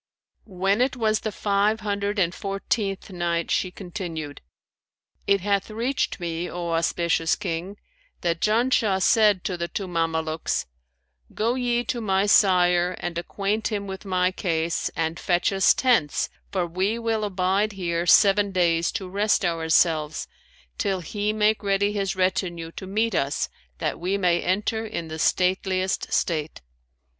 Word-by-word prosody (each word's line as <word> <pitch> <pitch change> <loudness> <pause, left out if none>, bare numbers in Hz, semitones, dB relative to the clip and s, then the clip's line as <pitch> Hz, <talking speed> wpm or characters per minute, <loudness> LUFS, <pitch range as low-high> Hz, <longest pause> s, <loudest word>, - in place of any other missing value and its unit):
When 195 +3 0
it 260 +1 +1
was 220 -3 +1
the 215 - -3
Five 210 +2 +1
Hundred 205 0 -2
and 175 -3 +2
Fourteenth 195 0 -3
Night, 170 -2 -1
She 185 - +1
continued, 175 -6 -6 0.9
It 200 -1 +3
hath 200 +1 0
reached 235 +4 -1
me, 170 0 -3
O 170 -1 -4
auspicious 165 0 +1
King, 175 +5 -4 0.4
that 170 -1 -1
"Janshah 220 -3 +2
said 210 -4 +4
to 180 - -2
the 170 0 -2
two 195 +2 -4
Mamelukes, 160 -2 -1 0.7
'Go 225 +3 +1
ye 245 -1 0
to 240 -1 -3
my 195 -2 +1
sire 180 -3 +4
and 175 -1 -4
acquaint 200 +4 -2
him 205 -3 -3
with 190 -1 -7
my 185 -2 +1
case 165 -3 -1
and 165 0 -2
fetch 175 +2 +1
us 195 -1 +5
tents, 235 - +2 0.2
for 185 -3 0
we 190 +6 -1
will 225 -2 -1
abide 200 +1 0
here 175 -2 -2
seven 200 +1 +5
days 170 -2 +2
to 195 -4 -4
rest 200 +1 +1
ourselves, 160 -2 +1 0.5
till 195 -3 0
he 205 +5 -2
make 215 0 +2
ready 200 0 +1
his 195 -2 -1
retinue 180 -3 -1
to 190 - -8
meet 220 +3 0
us 140 -4 0 0.3
that - - -2
we 185 +4 -1
may 175 -3 +2
enter 210 +4 0
in 170 -7 -5
the 160 0 -6
stateliest 185 +2 0
state.' 155 -3 -1
190 Hz, 150 wpm, -24 LUFS, 170-210 Hz, 0.9 s, us